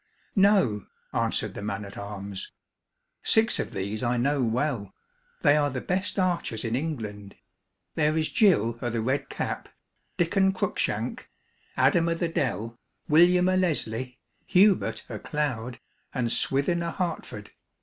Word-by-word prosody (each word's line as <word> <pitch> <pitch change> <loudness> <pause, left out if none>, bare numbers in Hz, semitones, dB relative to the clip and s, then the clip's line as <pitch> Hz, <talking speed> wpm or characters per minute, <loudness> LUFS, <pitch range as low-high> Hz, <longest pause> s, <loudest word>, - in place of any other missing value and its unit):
"No," 190 - +3 0.3
answered - - 0
the - - -7
man 100 0 -3
at 100 - -10
arms. 100 -1 -6 0.7
"Six 225 +1 +4
of - - -2
these 100 +3 -3
I 120 0 +1
know 140 +2 +1
well. 115 -3 -1 0.5
They 145 - +6
are 145 -1 +2
the 130 -2 -3
best 185 +9 -2
archers 175 - 0
in 115 +1 0
England. 110 -9 -4 0.6
There 155 0 +1
is 155 -1 +1
Gill 120 - +3
o' 120 - -1
the 115 0 -2
Red 135 +4 -1
Cap, - - -4 0.5
Diccon 190 +3 +2
Cruikshank, 185 - -2 0.5
Adam 170 -3 +4
o' 165 - +1
the 165 0 -1
Dell, 115 -7 -2 0.3
William 180 +3 +5
o' 185 - +3
Leslie, 130 -9 -1 0.3
Hubert 195 +1 +3
o' - - -6
Cloud, 125 -5 -3 0.4
and 120 -2 0
Swithin 140 +9 +2
o'Hertford. 170 - -4
140 Hz, 140 wpm, -27 LUFS, 115-175 Hz, 0.7 s, They